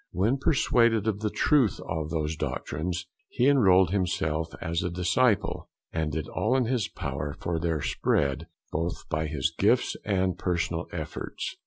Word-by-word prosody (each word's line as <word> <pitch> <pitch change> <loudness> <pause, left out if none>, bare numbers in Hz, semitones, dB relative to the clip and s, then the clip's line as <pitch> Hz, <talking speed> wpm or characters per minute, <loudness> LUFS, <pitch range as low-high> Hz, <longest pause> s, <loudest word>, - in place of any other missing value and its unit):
When 110 +10 +1
persuaded 115 -6 +3
of 105 -2 0
the 110 0 -1
truth 140 -2 +2
of 80 -2 -3
those 80 -1 -1
doctrines 85 +4 -3 0.2
he 125 - +2
enrolled 95 - +5
himself 80 -4 0
as 85 -1 -1
a 90 - -1
disciple, 95 +6 +1 0.2
and 80 -1 -1
did 80 +1 -3
all 125 +4 +1
in 130 - +2
his 120 -4 0
power 70 +1 -4
for 85 -1 -2
their 80 -3 -1
spread, 70 +4 0 0.2
both 85 +3 -3
by 80 0 -1
his 75 -3 -1
gifts - - +2
and 95 -3 0
personal 85 -2 -1
efforts. - - -5
90 Hz, 155 wpm, -27 LUFS, 80-110 Hz, 0.2 s, enrolled